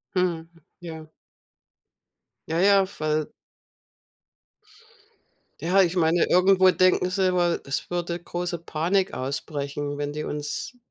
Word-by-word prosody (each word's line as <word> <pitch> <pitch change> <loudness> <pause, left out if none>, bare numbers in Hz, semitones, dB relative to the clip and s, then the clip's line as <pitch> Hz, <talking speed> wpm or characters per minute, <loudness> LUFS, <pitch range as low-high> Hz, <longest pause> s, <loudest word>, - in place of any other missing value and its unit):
Mhm. 170 -3 0 0.3
Ja. 160 -3 -9 1.4
Ja, 160 +1 0
ja, 195 +1 +5
weil 155 0 -1 2.3
ja, 180 +5 +3
ich 180 -1 +1
meine, 165 0 +3
irgendwo 185 +1 +5
denken 185 0 +3
sie 190 0 +1
immer, 175 -2 +1
es 140 0 -3
würde 175 0 -3
große 175 0 -4
Panik 175 +4 0
ausbrechen, 145 +1 -4
wenn 145 0 -3
die 150 +1 -4
uns 150 - -5
170 Hz, 110 wpm, -25 LUFS, 155-185 Hz, 2.3 s, ja